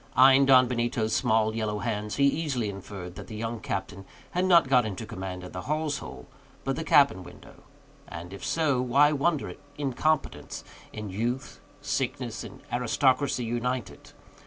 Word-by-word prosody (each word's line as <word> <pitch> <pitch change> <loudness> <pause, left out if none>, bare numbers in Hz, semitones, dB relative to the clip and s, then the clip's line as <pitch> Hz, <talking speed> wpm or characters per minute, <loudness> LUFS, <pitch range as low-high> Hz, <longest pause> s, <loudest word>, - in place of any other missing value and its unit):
Eying 135 +1 +7
Don 130 -2 +7
Benito's 120 -2 -1
small, 110 0 +2
yellow 110 -2 -1
hands, 105 -1 -3
he 140 - +1
easily 140 -6 +1
inferred 95 -2 -8
that - - -9
the 110 - -8
young 115 +1 -3
captain 95 - -4 0.3
had 180 +1 +1
not 170 -6 +6
got 130 -2 +4
into 110 0 -5
command 95 -4 -6
at 90 - -9
the 90 - -4
hawse 150 -1 0
hole, - - -9 0.4
but 135 0 -1
the 160 - -3
cabin 140 - +4
window; 90 - -14 0.5
and 85 +3 -8
if 100 - -9
so, 150 -6 +1
why 140 +4 +4
wonder 150 +1 +1
at - - -8 0.2
incompetence, 140 - -1 0.3
in 105 -2 -6
youth, 120 +7 -3 0.2
sickness, - - -2
and - - -11
gentility 125 +2 +1
united? 120 -1 -3
120 Hz, 160 wpm, -27 LUFS, 105-140 Hz, 0.5 s, Eying